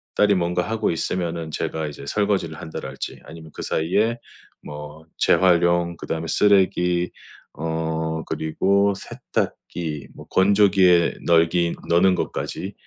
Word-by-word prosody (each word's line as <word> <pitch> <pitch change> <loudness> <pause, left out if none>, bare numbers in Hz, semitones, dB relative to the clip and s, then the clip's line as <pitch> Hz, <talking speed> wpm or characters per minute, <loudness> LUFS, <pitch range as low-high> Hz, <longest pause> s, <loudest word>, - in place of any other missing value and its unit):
딸이 105 -1 +4
뭔가 90 0 0
하고 115 -5 0
있으면은 85 -1 -2
제가 80 +1 -3
이제 70 -1 -9
설거지를 100 -6 0
한다랄지 80 - -7
아니면 80 -1 -11
그 - - -7
사이에 105 +9 0 0.5
뭐 75 +2 -9
재활용 85 -1 +3
그다음에 80 0 -4
쓰레기 90 -2 +2 0.4
어 80 0 -2
그리고 100 +6 +1
세탁기 80 -7 -4
뭐 - - -12
건조기에 95 -3 +4
널기 85 +1 +3
너는 90 +2 +4
것까지 95 +2 -4
85 Hz, 275 characters per minute, -22 LUFS, 80-95 Hz, 0.5 s, 딸이